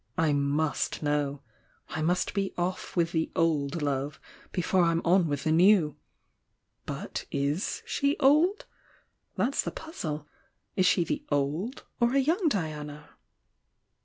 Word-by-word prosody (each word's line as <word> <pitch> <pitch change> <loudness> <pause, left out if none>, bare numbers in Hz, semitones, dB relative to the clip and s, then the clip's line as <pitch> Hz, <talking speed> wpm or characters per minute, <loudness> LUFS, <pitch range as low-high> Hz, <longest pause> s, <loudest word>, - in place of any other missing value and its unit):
I 160 -2 +3
must 145 +2 0
know! 145 -1 0 0.5
I 155 - -3
must 175 +3 +1
be 195 -1 -1
off 180 +1 -3
with 170 -2 +2
the 160 -1 0
'old' 155 -1 +1
love, 140 0 -2 0.3
before 180 +1 +1
I'm 165 -1 +2
on 175 0 +4
with 145 -2 -2
the 155 - +1
new! 170 -2 +5 0.9
But - - -5
is 145 +7 -1
she 280 +1 +1
the - - -14
'old'? 325 +9 +4 0.7
That's 275 +3 +1
the - - -3
puzzle. 155 - -6 0.5
Is 185 -1 +3
she 180 - +4
the 165 - -3
'old,' 150 - -1 0.2
or 240 +2 +3
a - - +5
young 325 +7 +2
Diana?" 150 - -4
165 Hz, 140 wpm, -28 LUFS, 150-195 Hz, 0.9 s, new